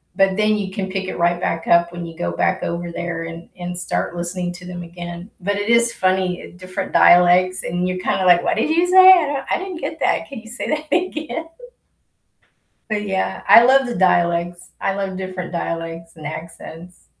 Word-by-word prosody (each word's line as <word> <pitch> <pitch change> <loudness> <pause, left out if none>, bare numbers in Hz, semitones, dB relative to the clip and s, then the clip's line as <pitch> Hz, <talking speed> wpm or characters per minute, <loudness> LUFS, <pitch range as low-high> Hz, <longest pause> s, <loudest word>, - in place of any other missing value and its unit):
But 195 0 +2
then 215 0 +2
you 195 -2 -4
can 190 -1 -4
pick 190 0 -3
it 185 - -5
right 175 +1 +1
back 165 0 -2
up 170 0 +4
when 175 0 -6
you 165 -1 -9
go 85 0 -2
back 85 - 0
over 170 0 -4
there 170 -1 -4
and 165 +1 -9
and 175 0 -5
start 175 -1 -3
listening 175 +1 -3
to 180 0 -12
them 175 -1 -7
again. 175 +2 -9
But 205 +2 -1
it 205 +2 -3
is 235 0 +4
funny, 185 -4 0
uh, - - -9
different 185 0 -6
dialects, 180 +1 +5
and 180 +1 -2
you're 185 - -2
kinda 185 - -1
like, 175 -1 +5
"What - - 0
did 225 - 0
you 335 +3 +3
say? 375 +1 +8
I 355 -4 +6
don't 280 -1 -3
I - - +2
didn't 370 -3 -7
get - - -5
that. - - 0
Can 275 - -7
you 225 - -15
say 240 - -5
that 305 0 -2
again?" 325 -2 -2 1.4
But 210 -1 -1
yeah, 190 -1 -2
I 230 - +9
love 265 +1 +5
the 240 - -4
dialects. 175 -2 +1
I 195 - -1
love 195 -1 -4
different 185 -1 -6
dialects 165 0 -5
and 155 -2 -9
accents. 165 +2 -9
180 Hz, 210 wpm, -20 LUFS, 175-210 Hz, 1.4 s, I